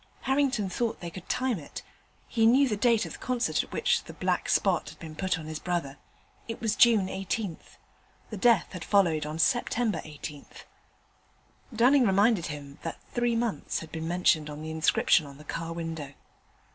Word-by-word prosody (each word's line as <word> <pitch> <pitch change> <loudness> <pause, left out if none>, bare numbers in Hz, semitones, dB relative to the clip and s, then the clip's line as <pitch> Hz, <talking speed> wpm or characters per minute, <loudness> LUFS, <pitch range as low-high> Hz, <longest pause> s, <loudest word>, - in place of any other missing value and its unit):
Harrington 265 -6 +1
thought 225 +5 -2
they 170 -1 -6
could 180 +1 -10
time 255 -6 0
it. 145 - -9 0.4
He 225 -1 +3
knew 265 +4 +5
the 215 - 0
date 230 +1 +3
of - - -7
the - - -8
concert 250 -1 0
at - - -12
which - - +1
the - - -9
'black - - -1
spot' - - +2
had - - -13
been 160 -2 -9
put 185 +2 0
on 160 - -8
his 155 0 -5
brother: 165 -6 -3 0.5
it 230 - -5
was 220 -2 0
June 230 -6 +5
18th. 195 -1 -4 0.5
The 215 - -4
death 230 -2 +3
had 180 -2 -6
followed 170 -7 +2
on 155 +1 -5
Sept. 240 +9 +2
18th. 155 -10 -4 1.1
Dunning 250 +2 +4
reminded 200 -1 +3
him 145 -2 -8
that 165 - -5
three 240 -1 +1
months 230 -2 -1
had 160 - -7
been 160 0 -4
mentioned 165 -3 +2
on 150 +1 -7
the 160 - -5
inscription 160 0 +3
on 140 -1 -12
the 150 - -13
car 165 +2 -5
window. 165 -4 -5
185 Hz, 185 wpm, -28 LUFS, 160-230 Hz, 1.1 s, knew